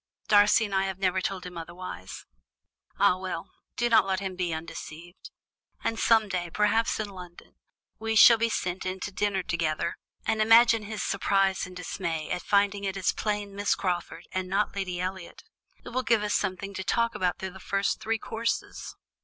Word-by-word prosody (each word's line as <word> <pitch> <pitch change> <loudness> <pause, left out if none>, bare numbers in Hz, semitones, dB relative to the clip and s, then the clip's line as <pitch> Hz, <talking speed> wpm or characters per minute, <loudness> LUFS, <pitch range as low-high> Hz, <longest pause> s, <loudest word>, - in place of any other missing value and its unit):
Darcy 210 +2 +5
and 205 - -6
I 190 0 +2
have 190 -1 -3
never 190 -1 +1
told 185 -1 -3
him 180 -2 -7
otherwise." 165 - -8 0.7
"Ah, 180 - +4
well, 185 -3 -5 0.3
do 240 - +2
not 230 - +5
let 190 -1 0
him 190 -1 -4
be 180 -2 -1
undeceived; 165 +2 -8 0.5
and 225 - -1
some 225 -2 +4
day, 180 -3 -3
perhaps 210 +5 +1
in 215 - -2
London, 180 -3 -12 0.5
we 225 0 -1
shall 230 +1 +8
be 230 0 +2
sent 180 -4 -2
in 185 0 -3
to 205 - -4
dinner 200 -1 0
together, 165 -1 -1 0.3
and 220 0 +1
imagine 225 0 +6
his 215 +1 -4
surprise 195 -1 +1
and 185 - -12
dismay 165 -3 -4
at 180 - -1
finding 200 0 +2
it 195 -1 -2
is 190 - +1
plain 205 -2 -3
Miss 205 0 +1
Crawford, 175 -2 -3
and 185 0 -3
not 200 +2 0
Lady 185 -3 -3
Elliot! 185 -1 -5 0.4
It - - -6
will 255 +1 -1
give 230 -3 +2
us 210 - -1
something 195 0 -2
to 190 - -4
talk 230 +4 +1
about 180 -1 0
through 190 0 -5
the 190 - -12
first 195 +1 -1
three 225 +1 0
courses. 230 +1 -3
195 Hz, 185 wpm, -27 LUFS, 180-210 Hz, 0.7 s, shall